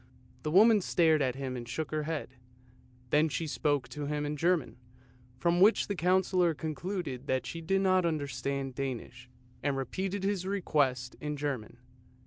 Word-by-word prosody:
The 155 - -2
woman 210 +5 +6
stared 160 -4 +3
at 130 -2 +1
him 135 -1 -4
and 120 -1 -7
shook 155 +5 -3
her 155 0 0
head; 155 -5 -4 0.8
then 155 +2 +4
she 165 - -2
spoke 145 -3 0
to 145 +3 -5
him 150 0 -1
in 145 +1 -2
German, 165 -4 +1 0.6
from 170 +6 +2
which 210 +4 +6
the 205 - -1
Councillor 180 -1 +2
concluded 155 -3 -4
that 130 -1 0
she 165 +8 -5
did 195 +4 +1
not 185 -1 +3
understand 140 -4 -2
Danish, 125 -2 -5 0.3
and 140 -1 0
repeated 190 +9 -3
his 195 -2 -1
request 140 -10 0
in 150 0 -3
German. 135 -6 -4
150 Hz, 160 wpm, -30 LUFS, 135-180 Hz, 0.8 s, woman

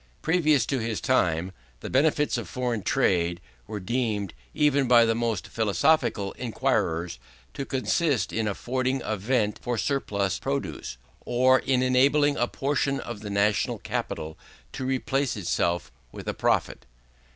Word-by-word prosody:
Previously 155 -7 +3
to - - -3
his 115 -2 -2
time, 90 -8 +1 0.3
the - - -6
benefits 150 +2 +2
of 115 -8 -4
foreign 120 +1 -2
trade 85 -2 +1 0.3
were 105 - -5
deemed, 105 -2 -2 0.2
even 145 -3 +2
by 120 -1 +6
the 115 - +2
most 115 -4 -2
philosophical 105 - +1
enquirers, 85 - -1 0.3
to 140 - -4
consist 130 - 0
in 110 -1 0
affording 130 +5 -1
a 110 - -1
vent 105 0 0
for 120 -1 -2
surplus 100 -5 -1
produce, - - -4 0.3
or 130 +1 +4
in 130 -1 +1
enabling 140 +3 +3
a 120 - +1
portion 140 0 -1
of 120 -5 -6
the 105 - -7
national 100 0 +1
capital 80 0 -4 0.3
to 130 - -5
replace 135 0 0
itself 85 -6 -1 0.2
with - - -9
a - - -1
profit. - - 0
120 Hz, 140 wpm, -26 LUFS, 100-135 Hz, 0.3 s, by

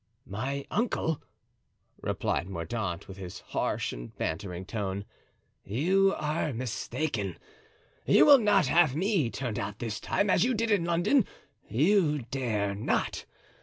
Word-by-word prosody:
"My 135 +7 -3
uncle," 210 - 0 0.8
replied 90 - -1
Mordaunt, 90 +1 -3
with 95 - -9
his 90 -2 -8
harsh - - -1
and - - -9
bantering 90 +2 -3
tone, 100 -1 -3 0.6
"you 190 - +2
are 150 0 -1
mistaken; 115 - -3 0.7
you - - +7
will 285 -2 +9
not 205 -4 +4
have 165 -5 +4
me 185 - +1
turned 120 -3 -3
out 100 +1 -4
this 110 -2 -4
time 200 - 0
as 190 - +4
you 250 +1 +2
did 225 +1 0
in 195 -5 +3
London—you 170 - +1
dare 110 -7 -1
not. 100 +2 -1
130 Hz, 130 wpm, -29 LUFS, -, 0.8 s, will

